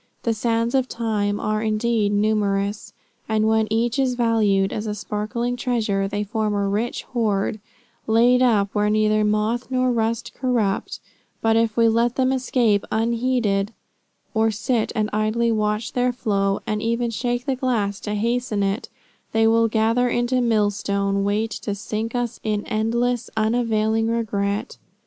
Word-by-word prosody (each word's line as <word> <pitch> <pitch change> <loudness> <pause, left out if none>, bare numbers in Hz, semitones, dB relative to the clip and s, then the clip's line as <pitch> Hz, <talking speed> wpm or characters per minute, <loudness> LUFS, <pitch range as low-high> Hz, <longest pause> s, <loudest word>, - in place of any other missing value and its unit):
The 230 - +1
sands 230 +1 0
of 260 -2 +2
time 210 -3 -1
are 215 0 -1
indeed 215 -1 +1
numerous, 205 -1 0 0.4
and 215 0 +2
when 220 0 +2
each 230 +4 0
is 260 -2 +1
valued 215 -5 +2
as 215 +1 -3
a 210 - -2
sparkling 215 +4 -3
treasure, 220 -6 0
they 205 +1 -2
form 215 0 -1
a 200 0 0
rich 210 +4 -2
hoard, 215 -3 0 0.5
laid 240 +3 +4
up 210 -6 +2
where 210 0 +1
neither 215 0 +2
moth 215 +4 0
nor 255 -1 +1
rust 230 -1 -1
corrupt; 235 -7 -1 0.4
but 225 0 +2
if 225 -1 +1
we 230 -1 +5
let 230 +2 +2
them 260 0 +2
escape 245 -5 +1
unheeded, 230 -2 0 0.6
or 220 -1 +2
sit 220 +2 -1
and 215 -1 +1
idly 215 +2 +1
watch 215 0 -1
their 250 0 +1
flow, 200 -5 0
and 210 0 -2
even 235 +1 0
shake 245 +2 -2
the 270 - 0
glass 225 -6 -1
to 210 0 -4
hasten 230 -1 0
it, 195 +2 -2 0.4
they 225 0 +3
will 225 0 +4
gather 225 +3 +2
into 240 +1 0
a - - +2
millstone 200 -3 +1
weight 210 +3 0
to 205 - -4
sink 220 +3 -4
us 245 -1 -2
in 210 -1 -1
endless, 235 +2 0
unavailing 220 0 +1
regret. 210 -1 -2
220 Hz, 155 wpm, -22 LUFS, 210-235 Hz, 0.6 s, we